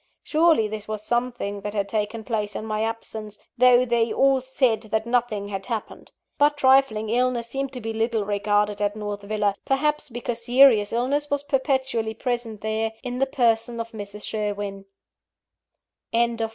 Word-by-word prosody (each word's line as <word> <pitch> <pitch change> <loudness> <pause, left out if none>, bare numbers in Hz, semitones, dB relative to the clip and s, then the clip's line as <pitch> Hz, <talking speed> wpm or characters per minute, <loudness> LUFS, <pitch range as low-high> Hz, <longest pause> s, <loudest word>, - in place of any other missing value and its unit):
Surely 315 -8 +3
this 210 0 -6
was 215 -1 -4
something 240 -4 -2
that 205 +1 -5
had 200 -1 0
taken 215 +2 -2
place 210 -3 -2
in 215 - -4
my 215 -1 -2
absence, 220 -2 -5 0.2
though 250 0 +6
they 235 -2 +1
all 270 +2 +3
said 260 -3 +1
that 220 +1 -2
nothing 235 -4 0
had 195 +1 -5
happened. 230 -3 -5 0.3
But 290 0 +4
trifling 260 -6 +3
illnesses 240 -1 0
seemed 275 0 -2
to 250 - -6
be 225 0 -4
little 225 -1 0
regarded 205 0 0
at 205 0 0
North 205 -1 -5
Villa 205 0 0
perhaps, 300 +2 0
because 240 -1 -4
serious 245 -4 +5
illness 280 +5 0
was 285 0 0
perpetually 265 -5 0
present 235 -3 -3
there, 220 +1 -1
in 250 -1 -4
the 270 - +2
person 235 -2 +1
of 230 0 -5
Mrs. 210 -1 -7
Sherwin. 205 -2 -3 1.3
VI. 230 -1 +1
225 Hz, 165 wpm, -24 LUFS, 210-250 Hz, 1.3 s, though